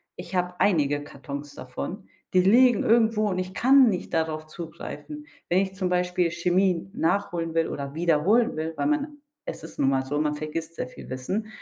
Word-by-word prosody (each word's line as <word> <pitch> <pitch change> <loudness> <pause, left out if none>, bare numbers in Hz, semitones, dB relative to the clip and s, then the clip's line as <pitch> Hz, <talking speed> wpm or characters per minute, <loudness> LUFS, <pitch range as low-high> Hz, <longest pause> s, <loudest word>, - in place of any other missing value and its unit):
ich 180 - -8
habe 180 0 0
einige 145 -6 +2
Kartons 145 0 -8
davon. 70 - -6 0.3
Die 185 - +7
liegen 235 +4 +5
irgendwo 220 -2 +3
und 185 -1 -1
ich 185 +1 -5
kann 260 -1 +6
nicht 180 -3 -3
darauf 160 -1 -1
zugreifen. 170 - -8 0.2
Wenn 175 - +3
ich 190 -1 -1
zum 185 -2 -2
Beispiel 180 -1 +1
Chemie 180 +1 +1
nachholen 170 -3 -1
will 165 - +2
oder 140 0 -5
wiederholen 175 +8 +3
will, 160 +1 -3
weil - - -1
man 300 0 0 0.3
es - - -6
ist - - -10
nun 135 -1 +3
mal 130 -1 +1
so, 145 +2 -1
man 150 -1 0
vergisst 160 +2 -5
sehr - - -3
viel - - -12
Wissen 160 +12 -3
175 Hz, 185 wpm, -26 LUFS, 155-200 Hz, 0.3 s, Die